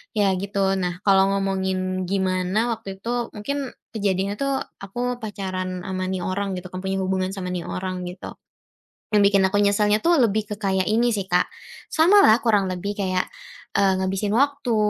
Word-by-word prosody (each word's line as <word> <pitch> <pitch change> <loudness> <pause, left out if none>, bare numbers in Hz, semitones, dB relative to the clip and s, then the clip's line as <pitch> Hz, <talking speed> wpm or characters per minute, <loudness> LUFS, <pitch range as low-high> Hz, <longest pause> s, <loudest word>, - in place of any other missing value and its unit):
ya 205 -2 +3
gitu. 195 -1 0
Nah, 180 -1 -2
kalau 195 0 +6
ngomongin 190 -1 -1
gimana 190 +4 0
waktu 200 -4 -6
itu, 240 0 -1
mungkin 275 +5 -3 0.2
kejadiannya 200 -1 0
tuh 275 -1 0 0.2
aku 245 +5 -3
pacaran 185 -3 -4
ama 185 -1 -2
ini 190 - -2
orang 195 +1 -2
gitu, 180 0 -6
kan 185 - -5
punya 190 0 -1
hubungan 185 0 -1
sama 185 -2 -5
ini 180 -1 -3
orang 185 -1 -4
gitu. 180 +1 -8 0.8
Yang 210 - +5
bikin 195 - +5
aku 205 - 0
nyeselnya 210 +1 +3
tuh 340 0 +4
lebih 215 -2 +2
ke 210 - -3
kayak 190 -2 +1
ini 235 +3 +3
sih, 200 -3 -2
Kak, 180 0 +3 0.5
samalah 330 - +6
kurang 210 -4 +3
lebih 185 +3 -4
kayak, 185 -2 0 0.5
eee, 195 -1 +4
ngabisin 195 +2 -1
waktu 280 -3 +1
195 Hz, 170 wpm, -23 LUFS, 185-215 Hz, 0.8 s, kalau